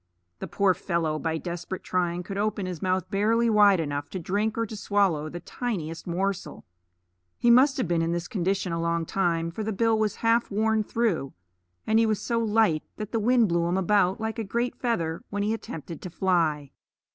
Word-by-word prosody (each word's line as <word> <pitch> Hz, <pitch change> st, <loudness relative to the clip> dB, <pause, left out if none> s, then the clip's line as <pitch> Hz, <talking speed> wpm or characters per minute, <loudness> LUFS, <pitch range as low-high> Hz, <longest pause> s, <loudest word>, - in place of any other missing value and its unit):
The -, -, -5 dB
poor 200 Hz, -2 st, +2 dB
fellow 165 Hz, -4 st, -1 dB
by 160 Hz, 0 st, -1 dB
desperate 175 Hz, +2 st, -5 dB
trying 180 Hz, -1 st, -1 dB
could 195 Hz, +2 st, -6 dB
open 210 Hz, -2 st, -1 dB
his 180 Hz, -3 st, -5 dB
mouth 185 Hz, -1 st, 0 dB
barely 225 Hz, +4 st, +2 dB
wide 205 Hz, -3 st, +6 dB
enough 145 Hz, -2 st, -3 dB
to 190 Hz, -, -5 dB
drink 205 Hz, +6 st, -1 dB
or 230 Hz, -, +1 dB
to 220 Hz, -, -8 dB
swallow 195 Hz, -7 st, +1 dB
the 175 Hz, -, -6 dB
tiniest 170 Hz, -11 st, -4 dB
morsel. 190 Hz, +2 st, -3 dB, 0.7 s
He 240 Hz, -, +4 dB
must 265 Hz, +3 st, +5 dB
have 255 Hz, -, 0 dB
been 170 Hz, -1 st, +1 dB
in 165 Hz, 0 st, 0 dB
this 170 Hz, +1 st, -2 dB
condition 190 Hz, -3 st, -1 dB
a 165 Hz, -, -1 dB
long 170 Hz, 0 st, 0 dB
time, 170 Hz, -2 st, 0 dB
for 215 Hz, +6 st, -5 dB
the 220 Hz, -, -2 dB
bill 225 Hz, +2 st, +2 dB
was 215 Hz, -1 st, 0 dB
half 230 Hz, +1 st, +3 dB
worn 220 Hz, +1 st, +1 dB
through, 205 Hz, -, -1 dB, 0.5 s
and 220 Hz, +1 st, +3 dB
he 225 Hz, -, +3 dB
was 215 Hz, -2 st, 0 dB
so 230 Hz, +2 st, -1 dB
light 215 Hz, -8 st, +2 dB
that 215 Hz, -1 st, -6 dB
the 230 Hz, -, 0 dB
wind 235 Hz, +1 st, +4 dB
blew 170 Hz, 0 st, +1 dB
him 175 Hz, +2 st, 0 dB
about 190 Hz, 0 st, +2 dB
like 220 Hz, +1 st, -3 dB
a -, -, -1 dB
great 235 Hz, +4 st, -2 dB
feather 170 Hz, -10 st, -2 dB
when 205 Hz, 0 st, -2 dB
he 215 Hz, +2 st, +1 dB
attempted 165 Hz, -7 st, -7 dB
to 180 Hz, -, -6 dB
fly. 165 Hz, -6 st, 0 dB
195 Hz, 205 wpm, -26 LUFS, 170-220 Hz, 0.7 s, wide